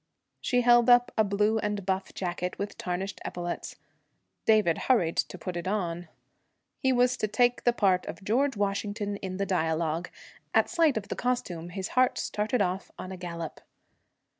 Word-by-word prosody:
She 245 -1 +1
held 240 0 +5
up 245 0 +6
a 220 - +4
blue 210 +2 +1
and 205 -2 -2
buff 190 0 -1
jacket 180 -1 -3
with 200 +1 -4
tarnished 185 +2 -4
epaulets. 175 -1 -4 0.7
David 215 -7 +4
hurried 180 -11 +3
to - - -1
put 180 +1 -5
it 175 +1 -4
on. 175 -4 -2 0.7
He 265 - +2
was 250 0 +3
to 215 - 0
take 245 +3 +2
the 240 - +6
part 190 -6 +2
of - - -7
George 250 +5 +1
Washington 205 0 -1
in 185 -2 -5
the 200 - 0
dialogue. 165 -2 0 0.5
At - - +4
sight 330 -7 +3
of 205 -1 -5
the - - -2
costume, 180 -9 -2
his 190 +1 -4
heart 255 0 +3
started 210 +2 0
off 185 +1 -3
on 185 - -7
a 190 - -6
gallop. 170 -3 -6
200 Hz, 170 wpm, -28 LUFS, 180-240 Hz, 0.7 s, up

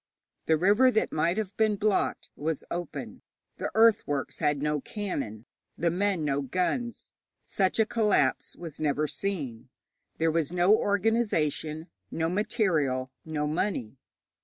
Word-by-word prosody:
The 160 - +4
river 205 +10 +5
that 220 -3 +1
might 170 +4 +1
have 205 -2 -3
been 215 -1 +3
blocked 205 0 0
was 155 0 -2
open; 175 0 -5 0.4
the - - -2
earthworks 220 -11 +3
had 150 -3 +1
no 150 0 0
cannon, 135 - -4 0.3
the 170 0 +1
men 185 -2 0
no 140 -1 +1
guns. 185 - -2 0.3
Such 190 -2 0
a 220 - +4
collapse 210 - +1
was 165 -4 -8
never 150 0 +1
seen. 145 - -4 0.5
There 165 0 +2
was 160 -1 0
no 180 +4 +5
organization, 200 -8 0 0.2
no 165 0 -1
material, 165 - 0
no 155 -2 -2
money. 150 - -2
170 Hz, 135 wpm, -28 LUFS, 150-205 Hz, 0.5 s, river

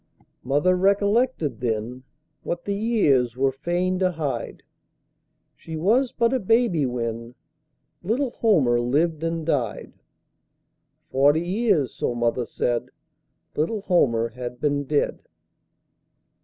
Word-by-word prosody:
Mother 145 +8 +2
recollected 200 - +1
then 120 +1 -3 0.4
What 175 0 -4
the 200 - -1
years 150 - +1
were 135 0 +2
fain 175 +6 -1
to 185 -1 +2
hide 155 -5 -4 0.9
She 160 - -8
was 235 +10 +2
but 235 +1 +1
a 260 - +1
baby 215 - +2
when 115 -1 -4 0.7
Little 235 +8 -1
Homer 145 - +2
lived 155 +6 0
and 165 -1 -2
died; 125 -10 -2 1.2
Forty 145 +4 +4
years, 185 - +1
so 120 - -2
mother 120 +1 0
said, 120 +1 -2 0.7
Little 185 +8 -1
Homer 115 - +2
had 125 +1 -7
been 145 0 0
dead. 145 +1 0
155 Hz, 115 wpm, -24 LUFS, 125-195 Hz, 1.2 s, Forty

